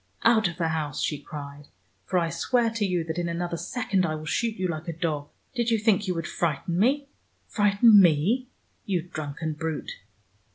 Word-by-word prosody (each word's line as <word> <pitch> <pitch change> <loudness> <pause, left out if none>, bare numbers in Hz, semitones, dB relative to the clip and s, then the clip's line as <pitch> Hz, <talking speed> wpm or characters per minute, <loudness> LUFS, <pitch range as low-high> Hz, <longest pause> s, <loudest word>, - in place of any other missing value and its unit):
"Out 220 -3 +5
of 170 -1 -6
the 165 -2 0
house," 150 -3 -2
she 150 - -1
cried, 145 0 -9 0.4
"for 185 - 0
I 165 -2 +1
swear 230 +7 +1
to 225 -2 -1
you 180 -2 0
that 160 +1 -4
in 170 -1 -1
another 170 0 -2
second 195 0 -1
I 155 -3 0
will 155 0 -7
shoot 225 +7 0
you 185 -2 -1
like 165 0 -5
a 170 - -2
dog. 155 -3 -2 0.2
Did 240 -2 0
you 225 - +3
think 210 -2 +2
you 180 - 0
would 165 -1 -3
frighten 170 +2 -1
me? 275 +6 +2 0.4
Frighten 205 0 +6
me! 185 - +3 0.4
you 180 -5 0
drunken 155 -1 -5
brute." 160 - -4
175 Hz, 195 wpm, -26 LUFS, 155-210 Hz, 0.4 s, Frighten